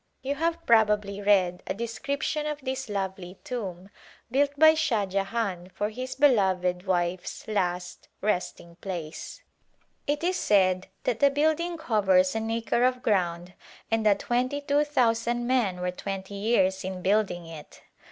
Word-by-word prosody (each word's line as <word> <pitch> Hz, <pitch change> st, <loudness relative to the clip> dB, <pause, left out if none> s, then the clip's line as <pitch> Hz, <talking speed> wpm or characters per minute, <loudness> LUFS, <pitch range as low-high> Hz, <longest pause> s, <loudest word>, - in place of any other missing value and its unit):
You 275 Hz, +2 st, -1 dB
have 330 Hz, +3 st, -2 dB
probably 210 Hz, -3 st, +3 dB
read 185 Hz, -3 st, +3 dB
a -, -, -2 dB
description 280 Hz, +7 st, -2 dB
of 300 Hz, -1 st, -3 dB
this 265 Hz, -2 st, -4 dB
lovely 190 Hz, -2 st, -4 dB
tomb 195 Hz, -6 st, -6 dB, 0.4 s
built 280 Hz, +3 st, +3 dB
by 315 Hz, +1 st, +8 dB
Shah 265 Hz, -10 st, +1 dB
Jahan 195 Hz, -1 st, -2 dB
for 210 Hz, +1 st, -1 dB
his 255 Hz, +3 st, -5 dB
beloved 190 Hz, -10 st, +3 dB
w^ife's 180 Hz, -1 st, -2 dB
last 180 Hz, -4 st, -2 dB
resting 180 Hz, -4 st, -2 dB
place. 170 Hz, -4 st, -7 dB, 0.6 s
It 295 Hz, +3 st, -1 dB
is 365 Hz, +1 st, +1 dB
said 185 Hz, -2 st, +2 dB, 0.2 s
that 235 Hz, -, -1 dB
the 280 Hz, -, +6 dB
building 315 Hz, +4 st, 0 dB
covers 190 Hz, -, +3 dB
an 225 Hz, 0 st, -2 dB
acre 230 Hz, +1 st, 0 dB
of 255 Hz, 0 st, +1 dB
ground 180 Hz, -3 st, 0 dB, 0.4 s
and 225 Hz, 0 st, +2 dB
that 210 Hz, -2 st, +4 dB
twenty 255 Hz, +4 st, -1 dB
two 285 Hz, 0 st, +2 dB
thousand 240 Hz, -3 st, +1 dB
men 235 Hz, -8 st, +1 dB
were 180 Hz, 0 st, -1 dB
twenty 195 Hz, +1 st, -6 dB
years 200 Hz, -2 st, +1 dB
in 185 Hz, -1 st, -5 dB
building 195 Hz, -4 st, +1 dB
it. 160 Hz, -2 st, -12 dB
210 Hz, 145 wpm, -27 LUFS, 185-255 Hz, 0.6 s, by